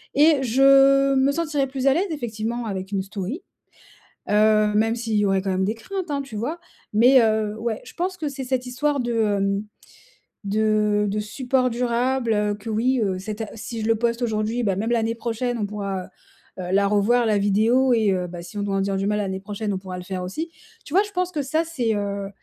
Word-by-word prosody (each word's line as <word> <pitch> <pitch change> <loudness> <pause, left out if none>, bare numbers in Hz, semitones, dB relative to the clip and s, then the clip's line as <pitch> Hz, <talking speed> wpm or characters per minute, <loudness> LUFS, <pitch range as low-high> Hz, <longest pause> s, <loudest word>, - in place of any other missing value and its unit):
et 295 -1 +5
je 275 +2 +5
me 265 +1 +3
sentirais 295 -3 -1
plus 265 0 -2
à 270 - +6
l'aise 360 +7 0
effectivement 235 -4 -3
avec 190 -2 -5
une 195 -1 0
story. 200 - -5 0.9
Heu, 215 0 +4
même 225 +2 +2
s'il 230 -2 -3
y 205 - +3
aurait 195 -1 +1
quand 195 - -2
même 190 0 +1
des 210 +3 0
craintes, 370 - -6
hein, 280 -1 -1
tu 255 -6 -9
vois? 280 +11 -3 0.3
Mais, 245 +5 +6
heu, 215 -1 +1
ouais, 225 -1 -2
je - - -12
pense 365 +2 -2
que 315 -4 -3
c'est 275 -1 -6
cette 255 0 -2
histoire 280 +3 0
de, 240 -1 -2
hem, 200 -2 +1 0.8
de 210 0 +1
de 210 +2 -1
support 255 +4 0
durable, 240 0 0
heu, 210 0 +1
que 205 +2 -9
oui, 245 +4 +1
heu, 190 -3 0
c'est 205 +3 -5
ta 220 -1 -5
si 225 +1 -6
je - - -2
le 225 - +3
poste 235 +1 0
aujourd'hui, 220 +1 -1
ben 195 -3 +1
même 220 +3 -1
l'année 230 -1 +1
prochaine, 235 +1 -2
on 210 - -1
pourra, 200 -2 -4 0.6
heu, - - -4
heu, - - -3
la 200 +1 +3
revoir 210 +4 +3
la 215 -2 +2
vidéo 225 +6 +3
et 220 -3 +2
heu, 180 -1 -1
bah, 175 0 -8
si 205 +4 -9
on - - -1
doit 200 -1 -1
en - - +1
dire 195 0 -1
du 195 - -1
mal 210 +1 +1
l'année 190 -2 -2
prochaine, 205 +1 -4
on - - -2
pourra 185 -1 -7
le 180 - -8
faire 185 0 -4
aussi. 310 - -4 0.3
Tu - - -12
vois, 390 - +6
je 415 - -9
pense 365 -1 -1
que 305 - -2
ça, 310 +5 0
c'est, 250 -9 -1
heu, 200 -1 -3
225 Hz, 230 wpm, -23 LUFS, 205-260 Hz, 0.9 s, à